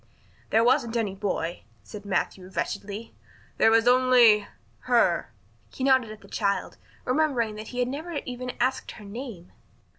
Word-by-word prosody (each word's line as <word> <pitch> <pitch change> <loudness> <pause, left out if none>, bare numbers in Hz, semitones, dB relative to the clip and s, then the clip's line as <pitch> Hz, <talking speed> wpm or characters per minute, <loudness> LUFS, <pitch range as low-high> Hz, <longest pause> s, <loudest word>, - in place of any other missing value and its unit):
"There 225 +1 +4
wasn't 240 -2 +2
any 210 -4 -1
boy," 185 -4 -3 0.2
said 205 - -10
Matthew 190 -1 -2
wretchedly. 200 +3 -4 0.4
"There - - +5
was 225 +1 +4
only 245 -4 +5 0.4
her." - - +2 0.4
He 260 - -6
nodded 260 -4 +3
at 215 -1 -11
the 195 - -15
child, 200 -1 -1 0.3
remembering 255 -5 +1
that 215 0 -7
he 250 - -8
had 245 0 +1
never 310 +7 -5
even 250 0 -5
asked 255 +2 -1
her 215 - -12
name. 205 -4 -8
230 Hz, 150 wpm, -26 LUFS, 205-255 Hz, 0.4 s, There